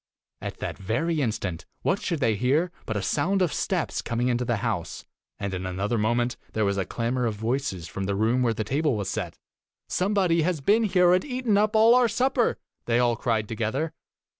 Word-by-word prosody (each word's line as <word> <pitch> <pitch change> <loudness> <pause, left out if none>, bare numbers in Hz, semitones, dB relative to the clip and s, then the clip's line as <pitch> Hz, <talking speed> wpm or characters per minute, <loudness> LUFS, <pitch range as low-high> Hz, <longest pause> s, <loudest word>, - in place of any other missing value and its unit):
At - - -5
that - - -4
very 145 - 0
instant, 100 -8 -3 0.2
what 190 - +1
should 170 -5 -2
they 115 -3 +3
hear 140 - +1 0.2
but 110 - -1
a 100 - -2
sound 190 - +1
of 170 - 0
steps - - -1
coming 120 +2 -1
into 120 0 +1
the 120 -1 0
house, 105 -8 -3 0.3
and 100 -1 -4
in 90 0 -3
another 95 +5 -1
moment 120 +3 +1 0.2
there 110 -1 +1
was 100 0 0
a 95 - -2
clamor 120 +1 -1
of 110 - -2
voices 110 - -2
from 95 +5 -4
the 100 0 -1
room 115 +5 +2
where 115 -2 +1
the 110 - -1
table 140 +2 0
was 100 - -3
set - - -4 0.3
' - - -68
Some 195 +3 0
body 175 -4 +3
has 170 0 0
been 215 +11 +3
here 180 -3 +4
and 180 - +3
eaten 250 -6 0
up 210 +1 +2
our 235 +3 +6
supper!' 245 +2 +1 0.3
they 120 0 +3
all 120 -1 +3
cried 115 -3 -1
together. 120 +9 -2
125 Hz, 210 wpm, -26 LUFS, 110-180 Hz, 0.3 s, our